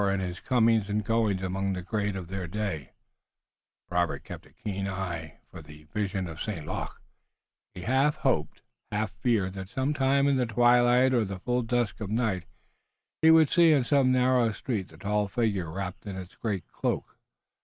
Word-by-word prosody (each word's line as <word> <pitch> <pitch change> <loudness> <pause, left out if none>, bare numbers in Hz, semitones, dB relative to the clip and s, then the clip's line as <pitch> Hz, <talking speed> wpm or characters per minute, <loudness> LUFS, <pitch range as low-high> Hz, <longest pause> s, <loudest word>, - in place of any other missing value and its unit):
In 100 0 0
his 90 -2 -4
comings 115 -4 +2
and 105 +1 0
goings 110 -4 +1
among 95 +1 -1
the 90 -1 -5
great 105 +1 -1
of 90 -3 -5
their 95 -1 -4
day 90 -7 -4 0.9
Robert 90 -1 -1
kept - - -9
a - - -22
keen 100 -5 -4
eye 90 -5 -4
for 85 - -9
the 75 0 -14
vision 100 -3 -1
of 80 -2 -8
St. 90 -9 -4
Luc. - - -5 0.8
He 90 - -7
half 135 +9 +2
hoped, - - -1 0.3
half 105 -1 -1
feared 105 -7 0
that 95 -1 -7
some 135 +5 -1
time 140 -1 +2
in 140 -1 +3
the 125 -2 +1
twilight 120 +3 +4
or 120 -3 +3
the 95 -2 -5
full 125 +6 0
dusk 120 -2 -1
of 105 - -3
the 110 - -1
night 105 -7 0 0.8
he 160 - +6
would 160 -2 +6
see 170 -2 +6
in 140 -4 +4
some 130 0 +3
narrow 125 -2 +3
street 105 -6 -3
the - - -16
tall 105 0 0
figure 100 -6 -1
wrapped 95 +3 -6
in 100 - -5
its 95 -1 -8
great 100 -6 -3
cloak. - - -2
105 Hz, 185 wpm, -28 LUFS, 95-125 Hz, 0.9 s, he